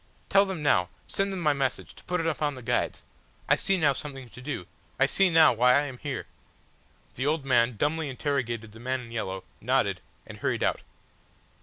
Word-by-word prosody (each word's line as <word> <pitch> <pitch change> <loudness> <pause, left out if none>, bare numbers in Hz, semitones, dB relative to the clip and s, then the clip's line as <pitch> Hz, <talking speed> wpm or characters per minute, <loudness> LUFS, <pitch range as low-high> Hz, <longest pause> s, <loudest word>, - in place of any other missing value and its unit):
Tell 195 0 +6
them 185 -5 -4
now 90 -11 +3 0.2
send 195 0 -1
them 190 -2 -4
my 150 -3 +3
message 135 -2 -2
to - - -16
put 180 0 -1
it 165 - -1
upon 150 -2 0
the 130 - -10
guides. - - -1 0.4
I - - +5
see 195 - +1
now 150 -5 +3
something 135 -2 -7
to 125 - -12
do. 130 -9 -4 0.3
I 135 - +6
see 190 +7 +3
now 160 -4 +6
why 125 +2 +5
I 140 - +5
am 135 -4 -6
here!" 140 -4 -4 0.9
The 130 +3 -1
old 150 -2 0
man 120 -3 +3
dumbly 155 +4 0
interrogated 120 -5 -2
the 110 - -13
man 130 +2 -2
in 115 -2 -11
yellow 95 -5 -3 0.2
nodded, - - +1 0.2
and - - -10
hurried - - 0
out. - - +1
135 Hz, 200 wpm, -27 LUFS, 125-155 Hz, 0.9 s, Tell